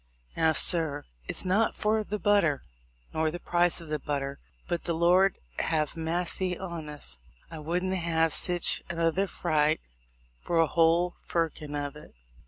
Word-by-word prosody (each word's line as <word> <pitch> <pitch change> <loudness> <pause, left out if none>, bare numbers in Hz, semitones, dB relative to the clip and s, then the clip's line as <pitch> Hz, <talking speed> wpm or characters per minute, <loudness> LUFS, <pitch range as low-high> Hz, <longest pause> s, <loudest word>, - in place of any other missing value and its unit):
Now, 160 -1 +2
sir, 155 -4 +5 0.2
it's - - -1
not 205 +5 +1
for 215 +1 0
the 210 0 -4
butter, 200 -8 +2 0.5
nor 160 0 0
the 175 +3 -6
price 175 0 +2
of 165 - -11
the 150 0 -2
but 145 +1 -2
ter, 140 0 -6 0.3
but, 175 - -3
the 170 - -1
Lord 180 +3 +3 0.2
have 155 -2 -1
massy 175 +2 +1
on 170 -5 -6
us, 65 - -6 0.3
I 160 - -7
wouldn't 180 +5 -2
have 165 -3 +1
sich 175 -1 +2
another 170 +3 0
fright 155 -2 0 0.6
for 170 - -2
a 165 - +5
whole 170 +2 +2
firkin 155 -3 -2
of 145 -1 -4
it. 150 - -14
165 Hz, 160 wpm, -28 LUFS, 155-180 Hz, 0.6 s, sir